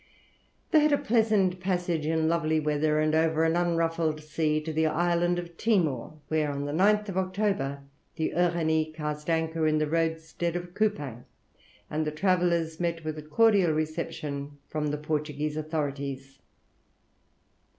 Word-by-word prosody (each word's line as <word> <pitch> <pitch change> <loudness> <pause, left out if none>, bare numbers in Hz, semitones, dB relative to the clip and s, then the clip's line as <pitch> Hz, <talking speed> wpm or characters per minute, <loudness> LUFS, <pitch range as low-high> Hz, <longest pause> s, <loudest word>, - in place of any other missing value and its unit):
They 315 - +6
had 300 0 +3
a 285 - +4
pleasant 215 -7 +2
passage 175 -4 -1
in 160 0 +1
lovely 160 -1 +1
weather, 150 0 +1
and 155 0 +2
over 160 0 +2
an 165 0 +2
unruffled 165 -2 +1
sea, 155 0 0
to 160 +1 -5
the 160 +1 +2
island 175 +2 +1
of 170 -1 -6
Timor, 165 - +1
where 155 -1 +1
on 140 0 -3
the 145 - -3
9th 205 +4 +2
October 185 -8 -1 0.3
the 160 - -1
Uranie 160 -3 +1
cast 150 0 -4
anchor 160 -1 +1
in 155 0 +2
the 155 - +2
roadstead 165 +1 -1
of 175 0 -5
Coupang, 150 - -1 0.6
and 155 0 -2
the - - 0
travellers 170 -1 +1
met 170 -2 -2
with 155 0 -3
a - - -6
cordial 190 +2 +3
reception 150 -2 -4
from 150 -1 -2
the 150 0 -1
Portuguese 150 0 -2
authorities. 140 -3 -4
160 Hz, 150 wpm, -28 LUFS, 150-175 Hz, 0.6 s, They